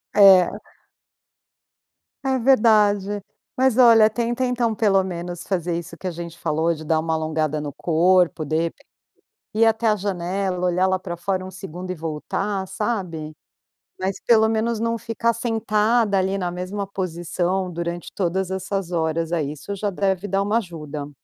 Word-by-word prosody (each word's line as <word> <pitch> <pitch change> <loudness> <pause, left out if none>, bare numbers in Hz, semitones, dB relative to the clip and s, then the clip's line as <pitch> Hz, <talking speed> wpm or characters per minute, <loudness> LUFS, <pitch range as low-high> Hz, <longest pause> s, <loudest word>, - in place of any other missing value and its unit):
É. 190 -3 +7 1.7
É 265 -1 +2
verdade. 210 -5 +3 0.3
Mas 260 -2 +2
olha, 230 -3 +7
tenta 240 +3 -1
então 240 -2 0
pelo 195 -3 +3
menos 175 -1 -5
fazer 175 -3 -1
isso 170 0 -8
que 185 - -6
a - - -1
gente 170 0 -8
falou 160 +1 0
de 155 -1 -8
dar 155 +1 +1
uma 160 0 -1
alongada 155 -1 -1
no 145 -1 -5
corpo 175 +2 +2
de 160 +3 0 0.8
ir 225 +1 +4
até 225 +1 +2
a 210 - +3
janela, 185 -1 -2
olhar 180 +1 +2
lá 185 0 +1
pra 180 -2 -6
fora 185 +2 -2
um 185 - -7
segundo 185 -1 -8
e - - -2
voltar, 185 +5 -3
sabe? 185 -6 -3 0.7
Mas 190 +1 -2
pelo 220 -2 +5
menos 225 +1 0
não 230 0 0
ficar 230 +1 0
sentada 225 -2 +1
ali 190 +1 0
na 180 -2 -2
mesma 185 +3 -4
posição 180 0 -2
durante 170 0 -5
todas 190 0 -1
essas 190 -1 -3
horas, 165 0 -1
aí 150 -4 -1
isso 150 +7 -7
já 205 +1 -2
deve 190 0 -1
dar 195 +1 +1
uma 205 +3 +1
ajuda. 150 -7 -6
190 Hz, 160 wpm, -22 LUFS, 170-210 Hz, 1.7 s, É